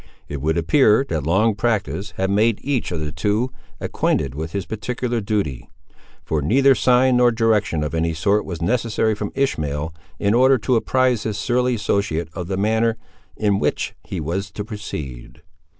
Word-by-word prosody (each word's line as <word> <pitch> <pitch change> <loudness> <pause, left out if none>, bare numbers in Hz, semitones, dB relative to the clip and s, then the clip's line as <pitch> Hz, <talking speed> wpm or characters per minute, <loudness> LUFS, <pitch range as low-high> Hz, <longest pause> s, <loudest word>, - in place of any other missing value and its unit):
It 70 -2 -5
would 80 +3 0
appear 110 - +4
that 80 -3 -2
long 105 +6 +3
practice 105 -2 -1
had 95 0 0
made 110 +2 +3
each 135 -8 -1
of 85 -3 -3
the 75 -1 -3
two 105 - 0 0.3
acquainted 65 - -1
with 80 +3 -5
his 100 -1 -3
particular 120 +2 -3
duty; 100 - -2 0.5
for 80 -2 -1
neither 135 - +4
sign 125 +1 +3
nor 125 -1 +5
direction 110 -8 +1
of 75 - -3
any 80 0 0
sort 100 +7 +2
was 85 -3 -5
necessary 110 +1 +1
from 105 -1 -4
Ishmael, 80 - -1 0.2
in 100 0 +1
order 130 +3 +5
to 125 +2 0
apprise 125 0 +2
his 105 -2 -3
surly 125 +3 +1
associate 100 -7 -1
of 90 0 -5
the 95 0 -2
manner 110 +3 +1 0.4
in 100 -2 +1
which - - -1
he 95 - -5
was 90 +6 -3
to 105 - -5
proceed. 75 - -7
105 Hz, 170 wpm, -21 LUFS, 85-115 Hz, 0.5 s, nor